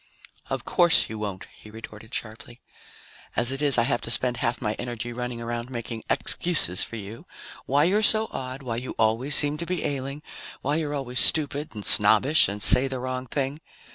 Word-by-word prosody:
"Of -, -, -5 dB
course 175 Hz, -2 st, +2 dB
you 110 Hz, -, -7 dB
won't," 100 Hz, -3 st, -6 dB
he 105 Hz, -, -16 dB
retorted 110 Hz, 0 st, -13 dB
sharply. 115 Hz, +2 st, -7 dB, 0.8 s
"As 120 Hz, +1 st, -1 dB
it 135 Hz, +1 st, -6 dB
is, 140 Hz, -4 st, +4 dB
I 120 Hz, -, +2 dB
have 120 Hz, -1 st, -2 dB
to -, -, -7 dB
spend 120 Hz, +1 st, +1 dB
half 120 Hz, -2 st, -3 dB
my 105 Hz, -3 st, -3 dB
energy 120 Hz, -1 st, -6 dB
running 125 Hz, 0 st, -6 dB
around 120 Hz, +1 st, -6 dB
making 115 Hz, -2 st, -7 dB
excuses 150 Hz, -, +1 dB
for -, -, -8 dB
you 105 Hz, +1 st, -10 dB, 0.4 s
why 140 Hz, +2 st, +1 dB
you're 195 Hz, +6 st, +1 dB
so 220 Hz, +1 st, +4 dB
odd, 130 Hz, +1 st, -7 dB
why 115 Hz, -3 st, -5 dB
you 125 Hz, +2 st, -7 dB
always 115 Hz, +6 st, +2 dB
seem 145 Hz, +1 st, +4 dB
to 170 Hz, -, -5 dB
be 180 Hz, -2 st, -4 dB
ailing, 140 Hz, 0 st, -5 dB, 0.4 s
why 145 Hz, +3 st, -1 dB
you're 150 Hz, -2 st, -4 dB
always 125 Hz, -3 st, -1 dB
stupid 150 Hz, -3 st, +3 dB
and 105 Hz, -, -8 dB
snobbish 135 Hz, +8 st, +4 dB
and 100 Hz, +1 st, -3 dB
say 130 Hz, +3 st, +8 dB
the 130 Hz, -1 st, -6 dB
wrong 130 Hz, 0 st, -6 dB
thing. 140 Hz, +4 st, -4 dB
125 Hz, 195 wpm, -23 LUFS, 115-145 Hz, 0.8 s, say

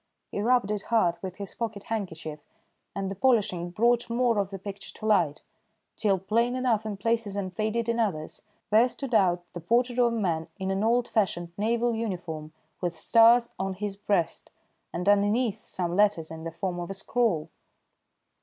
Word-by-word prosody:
He 205 Hz, -, -2 dB
rubbed 240 Hz, -2 st, +2 dB
it 210 Hz, -1 st, -1 dB
hard 180 Hz, -7 st, +2 dB
with 185 Hz, -1 st, -5 dB
his 200 Hz, -1 st, -7 dB
pocket 220 Hz, -4 st, -4 dB
handkerchief, 165 Hz, -8 st, -4 dB, 0.6 s
and 195 Hz, -1 st, -2 dB
the -, -, -2 dB
polishing 200 Hz, -6 st, +2 dB
brought 235 Hz, +6 st, +2 dB
more 235 Hz, -2 st, +2 dB
of 195 Hz, -1 st, 0 dB
the 195 Hz, -, -6 dB
picture 195 Hz, +1 st, -8 dB
to 215 Hz, -, -8 dB
light, 175 Hz, -9 st, +2 dB, 0.5 s
till, 200 Hz, -3 st, +2 dB
plain 230 Hz, +6 st, +1 dB
enough 235 Hz, -4 st, +1 dB
in 205 Hz, -2 st, -4 dB
places 225 Hz, -1 st, 0 dB
and 185 Hz, -3 st, -4 dB
faded 220 Hz, +3 st, -1 dB
in 230 Hz, 0 st, 0 dB
others, 170 Hz, -9 st, -2 dB, 0.3 s
there 225 Hz, +4 st, +6 dB
stood 255 Hz, 0 st, -6 dB
out, 180 Hz, -4 st, +3 dB
the 175 Hz, -, -5 dB
portrait 240 Hz, +7 st, +1 dB
of 240 Hz, -1 st, +4 dB
a 230 Hz, -, -2 dB
man 165 Hz, -6 st, -1 dB
in 190 Hz, 0 st, -2 dB
an 195 Hz, +2 st, 0 dB
old 235 Hz, +2 st, +2 dB
fashioned 175 Hz, -6 st, 0 dB
naval 235 Hz, +3 st, +1 dB
uniform 175 Hz, -8 st, -4 dB, 0.3 s
with 175 Hz, -2 st, -2 dB
stars 235 Hz, +4 st, +5 dB
on 190 Hz, 0 st, -2 dB
his 205 Hz, +1 st, -4 dB
breast, 195 Hz, -4 st, -1 dB, 0.4 s
and 180 Hz, +2 st, -4 dB
underneath 205 Hz, +3 st, +2 dB
some 175 Hz, -1 st, -2 dB
letters 200 Hz, -6 st, +2 dB
in 160 Hz, 0 st, -8 dB
the 165 Hz, -, -3 dB
form 175 Hz, +1 st, -3 dB
of 175 Hz, -, -5 dB
a 195 Hz, -, -4 dB
scroll. 210 Hz, -5 st, 0 dB
205 Hz, 180 wpm, -27 LUFS, 180-230 Hz, 0.6 s, there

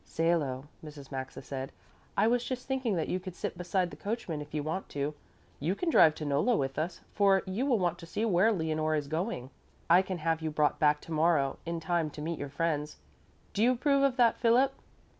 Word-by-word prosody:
"Salo," 155 Hz, -6 st, 0 dB, 0.2 s
Mrs. 145 Hz, -3 st, -10 dB
Maxa 130 Hz, -1 st, -6 dB
said, 135 Hz, -1 st, -5 dB, 0.5 s
"I -, -, +4 dB
was 240 Hz, +1 st, +2 dB
just 255 Hz, 0 st, -4 dB
thinking 260 Hz, -6 st, 0 dB
that 165 Hz, -, -1 dB
you 185 Hz, -, -1 dB
could 185 Hz, -1 st, -8 dB
sit -, -, -4 dB
beside 180 Hz, +1 st, -1 dB
the -, -, -8 dB
coachman 165 Hz, -2 st, -4 dB
if 150 Hz, -, -9 dB
you 150 Hz, -1 st, -2 dB
want 160 Hz, +5 st, -3 dB
to. 145 Hz, +1 st, -2 dB, 0.5 s
You 165 Hz, +7 st, 0 dB
can 330 Hz, -, -1 dB
drive 155 Hz, -, +6 dB
to 155 Hz, -, -5 dB
Nolla 145 Hz, -, +2 dB
with 135 Hz, +1 st, -2 dB
us, 170 Hz, +2 st, -3 dB
for 195 Hz, -2 st, +4 dB
you 200 Hz, +9 st, -1 dB
will 250 Hz, -5 st, +3 dB
want 175 Hz, -3 st, 0 dB
to 170 Hz, -, -10 dB
see 215 Hz, +6 st, -1 dB
where 205 Hz, +1 st, +4 dB
Leonore 155 Hz, -4 st, 0 dB
is 145 Hz, -2 st, -2 dB
going. 155 Hz, -, -3 dB, 0.4 s
I 175 Hz, +2 st, +8 dB
can 185 Hz, -1 st, -4 dB
have 165 Hz, 0 st, 0 dB
you 160 Hz, -, -1 dB
brought 150 Hz, -1 st, +1 dB
back 150 Hz, -1 st, +3 dB
to -, -, -11 dB
morrow 155 Hz, -4 st, +2 dB
in 170 Hz, 0 st, -2 dB
time 165 Hz, -1 st, 0 dB
to -, -, -5 dB
meet 165 Hz, +1 st, -3 dB
your 145 Hz, -, -4 dB
friends. 150 Hz, 0 st, -2 dB, 0.6 s
Do 205 Hz, -, -1 dB
you 245 Hz, +3 st, +5 dB
approve 275 Hz, +2 st, +2 dB
of 275 Hz, -1 st, +2 dB
that, 235 Hz, -2 st, +4 dB
Philip?" 250 Hz, +3 st, +4 dB
165 Hz, 220 wpm, -30 LUFS, 150-205 Hz, 0.6 s, I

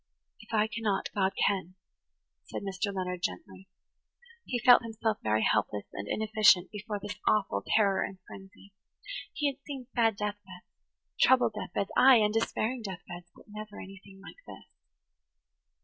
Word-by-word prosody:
"If -, -, -16 dB
I 215 Hz, -2 st, +3 dB
cannot, 220 Hz, -3 st, -2 dB
God 195 Hz, -1 st, +1 dB
can," 185 Hz, -2 st, -1 dB, 0.7 s
said -, -, -6 dB
Mr. 195 Hz, +1 st, -2 dB
Leonard 180 Hz, -2 st, -4 dB
gently. 90 Hz, -, -5 dB, 0.8 s
He 245 Hz, -, -2 dB
felt 245 Hz, +1 st, +7 dB
himself 225 Hz, -1 st, -2 dB
very 110 Hz, 0 st, +1 dB
helpless 105 Hz, -1 st, 0 dB
and 100 Hz, +1 st, -6 dB
inefficient 215 Hz, -4 st, +3 dB
before 210 Hz, 0 st, -5 dB
this 205 Hz, 0 st, -7 dB
awful 195 Hz, -, +1 dB
terror 200 Hz, -3 st, +3 dB
and 195 Hz, -, -6 dB
frenzy. 195 Hz, +1 st, -14 dB, 0.6 s
He 295 Hz, -, -3 dB
had 280 Hz, -1 st, -1 dB
seen 275 Hz, -4 st, -7 dB
sad 225 Hz, -3 st, +2 dB
death 210 Hz, 0 st, -3 dB
beds–troubled 200 Hz, +6 st, -1 dB
death 210 Hz, -, -7 dB
beds–ay, 250 Hz, +6 st, +5 dB
and 210 Hz, -2 st, +3 dB
despairing 225 Hz, +2 st, -1 dB
death 190 Hz, -5 st, -7 dB
beds, 175 Hz, 0 st, -9 dB
but -, -, -18 dB
never 210 Hz, 0 st, -9 dB
anything 195 Hz, 0 st, -12 dB
like -, -, -12 dB
this. -, -, -11 dB
205 Hz, 150 wpm, -29 LUFS, 190-220 Hz, 0.8 s, felt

